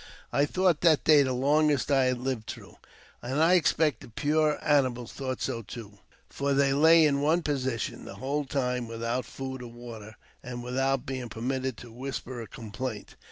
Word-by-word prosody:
I 145 Hz, +1 st, +3 dB
thought 180 Hz, -2 st, +2 dB
that 165 Hz, -4 st, +4 dB
day 150 Hz, -2 st, +7 dB
the 130 Hz, -2 st, +1 dB
longest 145 Hz, +2 st, +2 dB
I 135 Hz, -2 st, +4 dB
had 130 Hz, -1 st, +1 dB
lived 125 Hz, -3 st, -3 dB
through, -, -, -9 dB, 0.4 s
and 130 Hz, +4 st, -2 dB
I 165 Hz, +3 st, +5 dB
expect 155 Hz, -6 st, +3 dB
the -, -, -11 dB
poor 150 Hz, +5 st, +1 dB
animals 130 Hz, -5 st, +1 dB
thought 130 Hz, -2 st, -4 dB
so 115 Hz, -, -2 dB
too, 105 Hz, -1 st, -10 dB, 0.3 s
for 140 Hz, 0 st, -1 dB
they 140 Hz, 0 st, +3 dB
lay 160 Hz, +3 st, +6 dB
in 140 Hz, -2 st, +2 dB
one 160 Hz, +4 st, +2 dB
position 130 Hz, -6 st, -2 dB
the -, -, -8 dB
whole 140 Hz, +3 st, -2 dB
time, 125 Hz, -3 st, -1 dB
without 115 Hz, +2 st, -2 dB
food 130 Hz, -1 st, -6 dB
or 120 Hz, -, -8 dB
water, 115 Hz, -2 st, -10 dB, 0.3 s
and 120 Hz, -1 st, -7 dB
without 135 Hz, +1 st, 0 dB
being 130 Hz, -2 st, -4 dB
permitted 130 Hz, +2 st, -3 dB
to 120 Hz, -, -11 dB
whisper 130 Hz, 0 st, -6 dB
a 115 Hz, -, -8 dB
complaint. 110 Hz, +1 st, -6 dB
130 Hz, 180 wpm, -28 LUFS, 120-145 Hz, 0.4 s, day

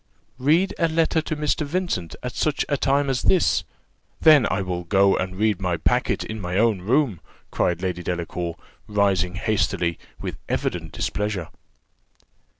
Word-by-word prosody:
"Read 160 Hz, +9 st, +3 dB
a 165 Hz, -, +3 dB
letter 160 Hz, 0 st, +1 dB
to 155 Hz, -, -3 dB
Mr. 150 Hz, +1 st, 0 dB
Vincent 150 Hz, -, -2 dB
at 125 Hz, -1 st, -4 dB
such 150 Hz, -2 st, 0 dB
a 145 Hz, -, +1 dB
time 140 Hz, +1 st, +1 dB
as 135 Hz, -2 st, 0 dB
this! 185 Hz, -, +3 dB, 0.6 s
then 150 Hz, -6 st, +6 dB
I 100 Hz, 0 st, 0 dB
will 90 Hz, -1 st, -3 dB
go 95 Hz, +2 st, +4 dB
and 95 Hz, 0 st, -3 dB
read 105 Hz, 0 st, +1 dB
my 90 Hz, -3 st, 0 dB
packet -, -, +1 dB
in 110 Hz, -1 st, -6 dB
my 90 Hz, 0 st, -2 dB
own 110 Hz, -3 st, +2 dB
room," 120 Hz, -, +1 dB, 0.3 s
cried 90 Hz, +1 st, 0 dB
Lady 90 Hz, -1 st, -2 dB
Delacour, 85 Hz, -1 st, -3 dB, 0.3 s
rising 100 Hz, -4 st, +1 dB
hastily, 95 Hz, -4 st, 0 dB, 0.2 s
with -, -, -5 dB
evident -, -, -2 dB
displeasure. 105 Hz, -5 st, -2 dB
105 Hz, 150 wpm, -23 LUFS, 90-145 Hz, 0.6 s, then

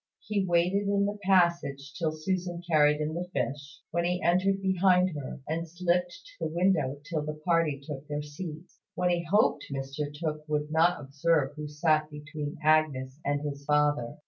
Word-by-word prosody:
He 205 Hz, -2 st, 0 dB
waited 180 Hz, +3 st, +2 dB
in 200 Hz, 0 st, +2 dB
the 205 Hz, +1 st, -3 dB
passage 170 Hz, -7 st, +2 dB
till 160 Hz, -2 st, -1 dB
Susan 175 Hz, +2 st, -3 dB
carried 150 Hz, -2 st, +4 dB
in 155 Hz, +1 st, -2 dB
the 175 Hz, +2 st, -4 dB
fish, 140 Hz, -1 st, -3 dB
when 170 Hz, 0 st, 0 dB
he 180 Hz, +1 st, 0 dB
entered 185 Hz, +3 st, +3 dB
behind 185 Hz, -1 st, +3 dB
her, 140 Hz, -1 st, -6 dB
and 165 Hz, +2 st, -2 dB
slipped 175 Hz, +1 st, 0 dB
to 165 Hz, -, -6 dB
the -, -, -7 dB
window 160 Hz, -7 st, +2 dB
till 155 Hz, +1 st, -2 dB
the 150 Hz, 0 st, -4 dB
party 165 Hz, -5 st, +2 dB
took 145 Hz, -1 st, -7 dB
their 150 Hz, -1 st, -3 dB
seats, 155 Hz, +3 st, -8 dB, 0.2 s
when 180 Hz, 0 st, +1 dB
he 175 Hz, -1 st, 0 dB
hoped 200 Hz, +6 st, +2 dB
Mr 135 Hz, +2 st, -4 dB
Tooke 155 Hz, 0 st, -4 dB
would 150 Hz, 0 st, -1 dB
not 170 Hz, +3 st, +3 dB
observe 145 Hz, +1 st, +1 dB
who 150 Hz, 0 st, -5 dB
sat 155 Hz, 0 st, +1 dB
between 150 Hz, 0 st, -6 dB
Agnes 150 Hz, -3 st, +2 dB
and 145 Hz, 0 st, 0 dB
his 140 Hz, -1 st, -4 dB
father. 145 Hz, -3 st, +1 dB
155 Hz, 175 wpm, -29 LUFS, 145-175 Hz, 0.2 s, carried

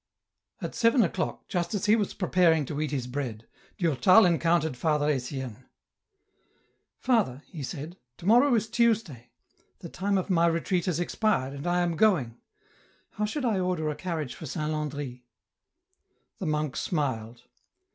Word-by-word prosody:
At -, -, -4 dB
seven 230 Hz, +1 st, +4 dB
o'clock, 180 Hz, -, -3 dB
just 175 Hz, +2 st, -2 dB
as 195 Hz, -, -2 dB
he 210 Hz, +1 st, +5 dB
was 210 Hz, -3 st, -1 dB
preparing 175 Hz, -5 st, +3 dB
to 145 Hz, +2 st, -4 dB
eat 155 Hz, -, -1 dB
his 135 Hz, -4 st, -2 dB
bread, 125 Hz, -4 st, -5 dB, 0.3 s
Durtal 175 Hz, -, +5 dB
encountered 165 Hz, -3 st, +2 dB
Father 150 Hz, +3 st, +1 dB
Etienne. 130 Hz, -3 st, -3 dB, 0.6 s
*' -, -, -43 dB
Father," 195 Hz, -, +1 dB
he 160 Hz, -, -9 dB
said, 155 Hz, +5 st, -6 dB
" 120 Hz, -, -55 dB
to 175 Hz, -, -12 dB
morrow 245 Hz, +5 st, +5 dB
is 220 Hz, 0 st, 0 dB
Tuesday; 225 Hz, -, 0 dB, 0.5 s
the -, -, -9 dB
time 200 Hz, +1 st, -1 dB
of 185 Hz, -, -2 dB
my 170 Hz, -1 st, +4 dB
retreat 170 Hz, +2 st, 0 dB
has 175 Hz, -3 st, 0 dB
expired, 175 Hz, -7 st, 0 dB
and 140 Hz, +4 st, -6 dB
I 175 Hz, 0 st, +2 dB
am 175 Hz, -1 st, 0 dB
going; 155 Hz, -, +2 dB, 0.7 s
how 210 Hz, -, -2 dB
should 260 Hz, +6 st, -3 dB
I 215 Hz, -5 st, +1 dB
order 180 Hz, -4 st, -1 dB
a -, -, -5 dB
carriage 155 Hz, -5 st, -4 dB
for -, -, -9 dB
Saint 150 Hz, +2 st, -3 dB
Landry? 145 Hz, -5 st, -4 dB, 0.5 s
" 370 Hz, +2 st, -48 dB
The 185 Hz, -, -3 dB
monk 150 Hz, -2 st, -1 dB
smiled. 120 Hz, -7 st, -2 dB
165 Hz, 165 wpm, -27 LUFS, 140-190 Hz, 0.7 s, he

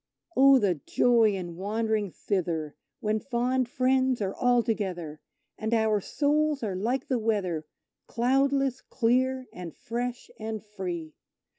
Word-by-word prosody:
Oh, 275 Hz, +1 st, +7 dB
the 190 Hz, -, +1 dB
joy 230 Hz, -4 st, +4 dB
in 175 Hz, -3 st, -6 dB
wandering 215 Hz, +1 st, -1 dB
thither, 165 Hz, -6 st, -2 dB, 0.3 s
when 215 Hz, 0 st, 0 dB
fond 250 Hz, +1 st, 0 dB
friends 260 Hz, 0 st, +2 dB
are 195 Hz, -2 st, -1 dB
all 245 Hz, -1 st, +3 dB
together 180 Hz, -9 st, -3 dB, 0.4 s
And 220 Hz, +2 st, 0 dB
our 220 Hz, -2 st, +2 dB
souls 295 Hz, +3 st, +1 dB
are 200 Hz, -4 st, -2 dB
like 240 Hz, +10 st, -1 dB
the 260 Hz, -4 st, +1 dB
weather 185 Hz, -8 st, -1 dB, 0.4 s
cloudless, 270 Hz, +2 st, +1 dB
clear 255 Hz, +2 st, +1 dB
and 175 Hz, -3 st, -8 dB
fresh 240 Hz, +1 st, -4 dB
and 220 Hz, -1 st, -5 dB
free! 180 Hz, -6 st, -5 dB
225 Hz, 130 wpm, -28 LUFS, 195-255 Hz, 0.4 s, Oh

